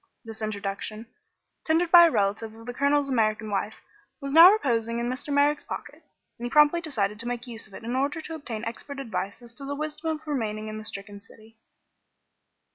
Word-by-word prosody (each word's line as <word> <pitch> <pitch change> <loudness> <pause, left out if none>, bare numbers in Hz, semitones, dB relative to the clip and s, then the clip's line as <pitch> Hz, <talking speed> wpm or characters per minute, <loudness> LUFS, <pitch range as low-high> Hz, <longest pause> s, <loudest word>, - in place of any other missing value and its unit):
This 225 0 -8
introduction, 215 +1 -4 0.6
tendered 330 +2 +1
by 345 -1 +10
a - - +2
relative 215 -2 -1
of 225 0 -13
the 245 - -5
Colonel's 280 +2 +2
American 220 -4 0
wife, 205 +2 -2 0.4
was 275 -1 -5
now 335 +4 +10
reposing 235 - 0
in 235 0 -1
Mr. 260 +4 -4
Merrick's 285 +1 +3
pocket, - - -8 0.4
and 240 - -5
he - - -5
promptly 300 +5 +5
decided 210 -10 -2
to 235 - -2
make 245 0 -3
use 230 -3 -7
of 200 - -14
it - - -10
in 235 +2 -3
order 280 +5 0
to 325 +1 -7
obtain 235 -8 -6
expert 270 +5 -6
advice 215 -4 -4
as 235 -1 -11
to 275 - -10
the 280 +1 -4
wisdom 305 +2 -4
of 305 - -22
remaining 215 -7 -3
in 215 0 -6
the - - -8
stricken 200 -1 -7
city. 220 +1 -17
235 Hz, 200 wpm, -26 LUFS, 215-290 Hz, 0.6 s, by